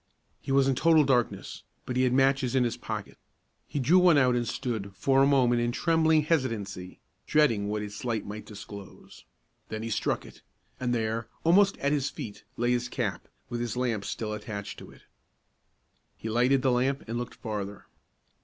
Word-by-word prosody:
He - - -5
was 135 0 +4
in 135 - +3
total 160 +3 +5
darkness, 125 -4 0 0.2
but 125 - -4
he 130 - +2
had 125 - +2
matches 135 -1 +2
in 130 - +4
his 120 - -1
pocket. - - -6 0.5
He - - -5
drew 160 +8 +5
one 180 -4 +6
out 125 -3 +4
and 120 -1 -1
stood, 110 -6 -3
for 135 +4 +3
a 135 - +5
moment, 125 -4 +3
in 120 0 0
trembling 160 +2 +3
hesitancy, 110 - -2 0.3
dreading 115 -10 +3
what 105 0 -2
its 105 0 -7
light 115 -4 -2
might 105 +1 -7
disclose. 100 -1 -11 0.4
Then 110 0 -4
he 115 - -4
struck - - -1
it, - - -14 0.4
and 125 -1 -1
there, 110 0 -2 0.2
almost 195 +4 +4
at 140 - 0
his 145 -2 +1
feet, 105 - -8
lay 120 +1 +1
his 120 0 0
cap, - - -3 0.2
with 120 0 -4
his 120 -1 -3
lamp 120 -5 -1
still 105 +1 -4
attached 105 -1 -6
to - - -11
it. - - -17 1.1
He 110 - -5
lighted 125 +3 +3
the 130 - +3
lamp 130 +3 0
and 115 +2 -3
looked 120 - -6
farther. 100 -2 -5
120 Hz, 185 wpm, -28 LUFS, 110-135 Hz, 1.1 s, one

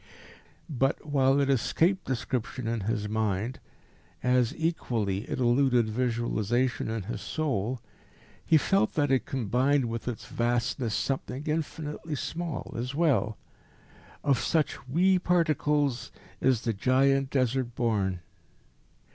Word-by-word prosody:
But, 135 -2 0
while 135 -2 +3
it 140 - +2
escaped 165 - +2
description 125 -1 -3
in 115 0 -1
his 105 -2 -1
mind, 110 +2 -1 0.6
as 125 -1 +3
equally 115 - -1
it - - -2
eluded 125 -2 +3
visualisation 120 0 0
in 110 -2 -2
his 115 +6 -5
soul, 130 -6 -2 0.6
he 160 - +5
felt 195 +7 +2
that 145 -3 +2
it 130 - +2
combined 130 +3 +1
with 115 0 -4
its 120 -3 -4
vastness 120 -1 -1
something 135 0 -2
infinitely 155 0 -3
small 165 +1 -4
as 125 +3 -3
well. 140 -9 +2 0.9
Of 140 -4 +3
such 155 -5 0
wee 180 +7 +3
particles 150 -7 +1 0.3
is 130 -4 +2
the 115 -2 -1
giant 135 +5 +2
Desert 130 -2 0
born.... 100 -7 0
130 Hz, 120 wpm, -28 LUFS, 115-145 Hz, 0.9 s, he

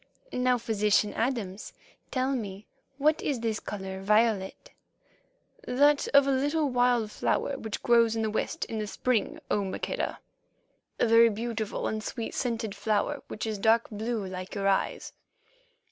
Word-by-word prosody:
Now, 250 0 +2
physician 210 -2 +1
Adams, 225 -5 -3 0.4
tell 260 +1 0
me 210 -5 -4 0.3
what 300 +2 +2
is 275 -5 -1
this 225 -2 -1
colour 190 -2 -6
vi 210 +4 +5
o 225 - +2
let?" 195 - -9 1.0
"That 285 +3 +3
of 280 -1 +5
a 275 - +2
little 290 +3 +1
wild 245 -3 +2
flower 280 - 0
which 220 -5 -5
grows 230 -2 +4
in 225 - -1
the 215 - -1
West 220 - -2
in 220 - -4
the 210 - -3
spring, 235 +1 -1
O - - +3
Maqueda—a 190 +4 -5
very 230 0 +6
beautiful 220 0 -3
and 215 0 -2
sweet 230 0 -5
scented 230 -4 -2
flower 220 +7 -1
which 215 - -5
is 215 -2 -3
dark 225 +2 +3
blue 220 0 -3
like 185 +1 -6
your 195 -1 0
eyes." 195 -1 0
225 Hz, 155 wpm, -28 LUFS, 210-250 Hz, 1.0 s, very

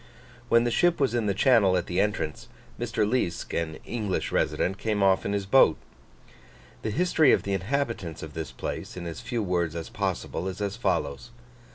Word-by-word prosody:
When 115 0 +5
the 120 - 0
ship 175 +7 +3
was 135 -4 +2
in 115 -3 0
the 100 - +2
channel 100 -6 +4
at 90 - -1
the 90 +1 -2
entrance, 100 -8 -2 0.3
Mr. 115 -3 0
Liesk, 105 -7 -1
an 80 -2 -2
English 105 -5 -2
resident, 95 +2 0
came 105 -2 0
off 95 -1 +3
in 100 - -1
his 100 -1 -1
boat. 100 -6 +5 1.0
The - - -2
history 160 - +3
of - - +2
the 100 - -2
inhabitants 100 - -2
of 80 -1 -8
this 80 -4 -5
place, - - -6
in 90 - -6
as 85 -2 -6
few 120 -2 -2
words 85 -4 -1
as 85 -1 -5
possible, 90 - -3
is 95 +1 -5
as 100 0 -2
follows. 70 - -1
100 Hz, 190 wpm, -27 LUFS, 85-115 Hz, 1.0 s, When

